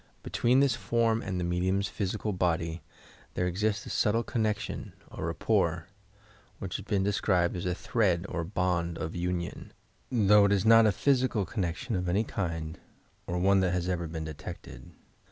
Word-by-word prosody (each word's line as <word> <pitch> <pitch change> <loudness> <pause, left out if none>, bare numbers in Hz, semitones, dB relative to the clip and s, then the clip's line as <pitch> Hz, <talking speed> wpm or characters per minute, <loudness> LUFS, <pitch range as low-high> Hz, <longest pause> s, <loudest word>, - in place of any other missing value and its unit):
Between 120 +8 +2
this 135 -4 +3
form 115 -2 +1
and 90 -2 -3
the - - -1
medium's 95 +3 0
physical 105 +2 -2
body 85 -2 -1 0.5
there 90 - 0
exists 100 +4 -1
a - - -6
subtle 115 +2 +2
connection 110 -3 -2 0.2
or - - -4
"rapport" 85 -1 0 0.7
which 95 -4 -4
has 100 - -9
been 100 -3 +1
de 100 +1 +1
scribed 90 -4 +1
as 90 0 -3
a 90 - 0
thread 95 -5 +1
or 85 - -3
bond 85 -2 -1
of 80 - -4
union, 90 0 -3 0.4
though 105 -3 +5
it 100 - +2
is 100 +1 +1
not 115 0 +7
a - - +4
physical 125 -4 +1
connection 90 +5 -3
of 90 -1 -1
any 100 +5 +2
kind 85 -7 -4 0.5
or 90 - -2
one 95 +2 +4
that 90 -2 +1
has 90 -1 -1
ever 85 -2 -1
been 80 0 -5
detected. 80 +3 -9
95 Hz, 170 wpm, -29 LUFS, 85-105 Hz, 0.7 s, not